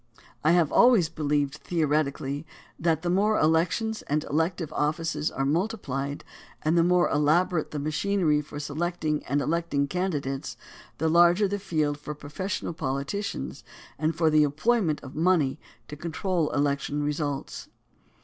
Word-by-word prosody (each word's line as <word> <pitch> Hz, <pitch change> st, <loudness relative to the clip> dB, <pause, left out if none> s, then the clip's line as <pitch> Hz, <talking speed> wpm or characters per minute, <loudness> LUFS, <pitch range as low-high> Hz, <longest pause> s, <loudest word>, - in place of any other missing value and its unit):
I 155 Hz, +3 st, +4 dB
have 170 Hz, -5 st, +3 dB
al 245 Hz, -, +7 dB
ways 190 Hz, -10 st, +3 dB
believed 145 Hz, -2 st, -1 dB
theoretically 150 Hz, -3 st, -1 dB, 0.4 s
that 160 Hz, -1 st, +1 dB
the 175 Hz, -, 0 dB
more 210 Hz, +4 st, +3 dB
elections 180 Hz, +8 st, +1 dB
and 150 Hz, +1 st, 0 dB
elective 160 Hz, +1 st, -1 dB
offices 155 Hz, 0 st, -1 dB
were 135 Hz, -, -2 dB
multiplied; 145 Hz, -, -2 dB, 0.4 s
and 155 Hz, +2 st, +2 dB
the 170 Hz, -, +5 dB
more 180 Hz, 0 st, +4 dB
elabo 155 Hz, +6 st, +3 dB
rate 155 Hz, -, -2 dB
the 150 Hz, -, -5 dB
machinery 155 Hz, +1 st, +1 dB
for 145 Hz, 0 st, -8 dB
selecting 155 Hz, +1 st, -2 dB
and 140 Hz, +2 st, +1 dB
electing 155 Hz, -3 st, 0 dB
candidates, 145 Hz, -6 st, -3 dB, 0.4 s
the 160 Hz, -, 0 dB
larger 175 Hz, +5 st, +5 dB
the 205 Hz, +1 st, -2 dB
field 155 Hz, -6 st, -1 dB
for 150 Hz, 0 st, -6 dB
professional 170 Hz, +6 st, -4 dB
politicians 140 Hz, -, -4 dB, 0.4 s
and 155 Hz, +1 st, 0 dB
for 160 Hz, -1 st, +2 dB
the 155 Hz, 0 st, +5 dB
employment 155 Hz, +3 st, +1 dB
of 135 Hz, -, -10 dB
money 160 Hz, -4 st, +2 dB, 0.3 s
to 150 Hz, -, -7 dB
control 170 Hz, +1 st, -1 dB
election 145 Hz, 0 st, 0 dB
results. 145 Hz, -1 st, -3 dB
155 Hz, 145 wpm, -26 LUFS, 145-175 Hz, 0.4 s, al